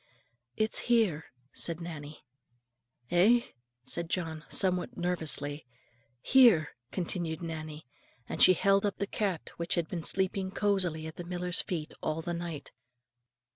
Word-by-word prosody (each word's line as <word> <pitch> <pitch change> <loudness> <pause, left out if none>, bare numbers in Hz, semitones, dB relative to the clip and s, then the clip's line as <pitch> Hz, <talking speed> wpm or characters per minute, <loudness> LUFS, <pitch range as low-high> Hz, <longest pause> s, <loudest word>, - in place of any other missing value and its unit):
"It's 215 +1 +2
here," 210 -11 +3 0.3
said 165 -1 -2
Nannie. 150 -4 -8 0.9
"Eh?" 210 +8 +5 0.4
said 170 +4 +1
John, 160 -4 -3
somewhat 180 -2 +1
nervously. 155 -5 -1 0.5
"Here," 230 - +6 0.2
continued 170 -2 -2
Nannie; 155 -2 -6 0.4
and - - -4
she 185 - +9
held 195 +2 +3
up 205 -1 -1
the 200 - -1
cat 195 -4 -3
which 170 0 -1
had 170 -2 0
been 170 0 -4
sleeping 190 +1 0
cosily 190 -6 0
at 160 - -8
the 175 - -5
miller's 180 0 +1
feet 160 -4 -4
all 155 +1 -2
the 175 - -3
night. 170 -3 -5
175 Hz, 135 wpm, -30 LUFS, 160-190 Hz, 0.9 s, she